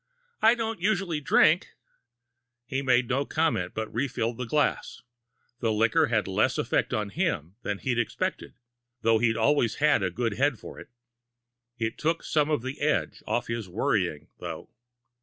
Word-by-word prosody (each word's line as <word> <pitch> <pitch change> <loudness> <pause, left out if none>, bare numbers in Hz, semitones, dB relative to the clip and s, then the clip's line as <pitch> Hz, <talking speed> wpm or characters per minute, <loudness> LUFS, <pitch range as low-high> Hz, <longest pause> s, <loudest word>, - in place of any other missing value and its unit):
"I 225 +2 +6
don't 225 -4 -3
usually 185 -6 0
drink." 140 - +3 0.9
He 135 +3 -2
made 125 -2 +3
no 135 +4 +1
comment, 155 - -1
but 110 0 -4
refilled 120 -2 -1
the 125 - -4
glass. 150 +2 0 0.6
The 115 -3 0
liquor 115 +9 +3
had 115 -5 0
less 95 - +1
effect - - 0
on 105 -1 -1
him 150 - -1
than 105 -3 -3
he'd 120 +2 -1
expected, 115 - -3 0.5
though 115 0 +4
he'd 115 -1 +2
always 120 0 +2
had 150 -5 +3
a 95 - +1
good 115 +4 -2
head 140 -2 +2
for - - -10
it. - - -12 0.9
It 115 -1 -3
took 165 +2 0
some 150 -1 +1
of 150 -6 0
the 130 +2 -6
edge 150 +1 0
off 120 - 0
his 115 -4 -4
worrying, 95 - -1
though. - - -7
120 Hz, 160 wpm, -27 LUFS, 110-150 Hz, 0.9 s, I